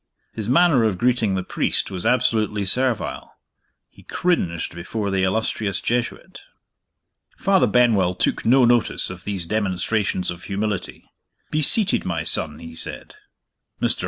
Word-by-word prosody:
His 110 -1 -4
manner 140 -2 +4
of 105 -5 +1
greeting 115 -3 +1
the 95 - -2
priest - - 0
was 90 -2 -2
absolutely 110 -4 +1
servile. 125 +3 -1 0.5
He - - -19
cringed 90 - -1
before 100 +4 -4
the 95 -1 0
illustrious 100 0 0
Jesuit. 120 0 -3 1.0
Father 190 -10 +3
Benwell 105 -6 +3
took - - -1
no 125 +2 +5
notice 120 -6 +1
of 90 -1 -10
these 95 -4 -2
demonstrations 100 -1 -1
of 85 0 -9
humility. 100 0 -4 0.4
"Be 155 - 0
seated, 200 +7 +2
my 85 -2 -2
son," 75 -2 0
he 80 0 -10
said. 80 - -2 0.7
Mr. - - +1
105 Hz, 135 wpm, -22 LUFS, 95-120 Hz, 1.0 s, no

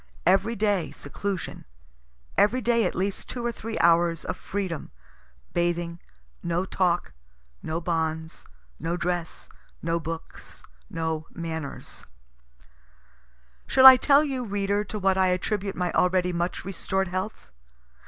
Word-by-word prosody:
Every 210 +5 +3
day, 205 -4 +1
seclusion 190 +6 -5 0.7
every 220 +5 +4
day 235 -3 +2
at - - -1
least 195 +2 -2
two 240 -1 -4
or 240 - +1
three 225 0 -6
hours 170 -1 +3
of - - -2
freedom, 190 -6 -4 0.6
bathing, 175 0 -1 0.4
no 170 +2 -1
talk, 180 -2 0 0.5
no 160 +1 -2
bonds, 160 -1 -2 0.4
no 170 +1 -2
dress, 175 -1 -3 0.3
no 165 +1 -1
books, 165 0 -8 0.3
no 160 -1 -3
manners. 160 -3 -6 1.6
Shall 260 0 +5
I 260 0 +14
tell 280 +3 +5
you, 265 -4 -2
reader, 200 -1 0
to 210 - -5
what 190 -1 +2
I 190 - +4
attribute 195 +2 -1
my 180 -1 -1
already 180 0 +2
much 175 +1 -2
restored 190 0 -2
health? 185 - -5
180 Hz, 125 wpm, -26 LUFS, 170-205 Hz, 1.6 s, I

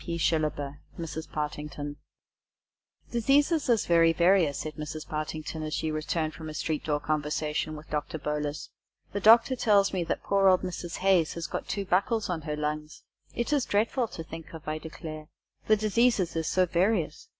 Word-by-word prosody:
P. 170 -1 -3
SHILLABER 150 -4 0 0.2
("Mrs. 160 -2 -5
Partington") 150 -1 -4
FANCY - - -39
DISEASES 225 - -7 0.3
"Diseases 310 -5 0
is 230 -3 +3
very 165 -1 +5
various," 170 -4 +3
said 155 +1 -4
Mrs. 155 0 -6
Partington, 155 +1 -4
as 155 0 -3
she 160 - -1
returned 155 +1 -1
from 160 -1 -8
a 155 - -7
street 155 0 -2
door 150 -1 0
conversation 155 +1 -1
with 150 +1 -11
Doctor 150 +1 -2
Bolus. 150 0 -3 0.4
"The 200 - -1
Doctor 230 +5 +6
tells 205 -5 +3
me 180 -2 0
that - - -2
poor 195 -1 +3
old 185 -1 +5
Mrs. 175 -2 -4
Haze 185 -4 +3
has 170 -1 -4
got - - -4
two 200 -1 -2
buckles 200 +3 +1
on 165 -2 -2
her 150 -1 -3
lungs! 150 0 -4 0.3
It 240 +5 -1
is 285 -3 +3
dreadful 230 +4 +1
to 165 - -7
think 165 0 -9
of, 160 -1 -11
I 155 0 -2
declare. 155 -1 -8 0.4
The 215 - +5
diseases 215 -3 +2
is 160 -1 -1
so 185 0 +3
various! 175 -2 0
160 Hz, 185 wpm, -28 LUFS, 155-195 Hz, 0.4 s, Doctor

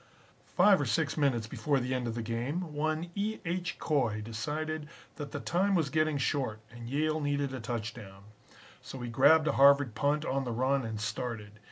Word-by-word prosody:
"Five 200 -5 +6
or 140 - -1
six 140 +6 0
minutes 135 -7 +1
before 140 +5 0
the 130 +1 -2
end 125 -2 -1
of 115 - -3
the 115 - -3
game, 140 +9 -3
one 155 +3 -2
E. 210 +3 -2
H. 175 +1 -2
Coy 120 -9 0
decided 150 +8 -4 0.3
that 145 -2 -6
the - - -4
time 190 +3 +1
was 155 -5 +1
getting 155 -1 +1
short 130 -5 -1
and 120 0 -9
Yale 155 +3 0
needed 145 -1 -1
a 130 - -4
touchdown. 110 -3 -6 0.6
So 135 - -9
he 120 - -4
grabbed 155 +6 +5
a - - +3
Harvard 140 -3 +6
punt 145 +7 0
on 135 +1 0
the 120 -2 -3
run 130 +3 +1
and 110 -1 -4
started. 105 -1 -4
140 Hz, 190 wpm, -30 LUFS, 115-155 Hz, 0.6 s, Five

